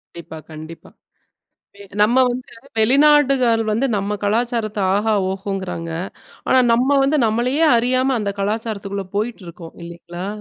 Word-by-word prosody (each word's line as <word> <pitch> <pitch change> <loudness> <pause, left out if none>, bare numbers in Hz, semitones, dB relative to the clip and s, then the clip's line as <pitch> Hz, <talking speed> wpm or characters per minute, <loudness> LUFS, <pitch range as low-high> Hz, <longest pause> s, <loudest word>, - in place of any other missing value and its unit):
கண்டிப்பா. 170 -1 -9
கண்டிப்பா. 155 +1 -11 0.9
பே 200 - -14 0.2
நம்ம 240 +5 +4
வந்து 250 +1 -5 0.3
வெளிநாடுகள் 265 -1 +4
வந்து 230 +6 +1
நம்ம 200 +1 -2
கலாச்சாரத்த 225 0 -1 0.2
ஆஹா, 215 +2 +1 0.2
ஓஹோங்குறாங்க. 190 -3 -5 0.6
ஆனா, 260 - +4
நம்ம 265 +4 +3
வந்து 275 +3 +2
நம்மளையே 245 +8 +1
அறியாம 255 +3 +1
அந்த 205 -1 -2
கலாச்சாரத்துக்குள்ள 200 -1 -3
போயிட்ருக்கோம் 185 -7 -5
இல்லைங்களா? 170 +1 -8
220 Hz, 115 wpm, -19 LUFS, 195-250 Hz, 0.9 s, நம்ம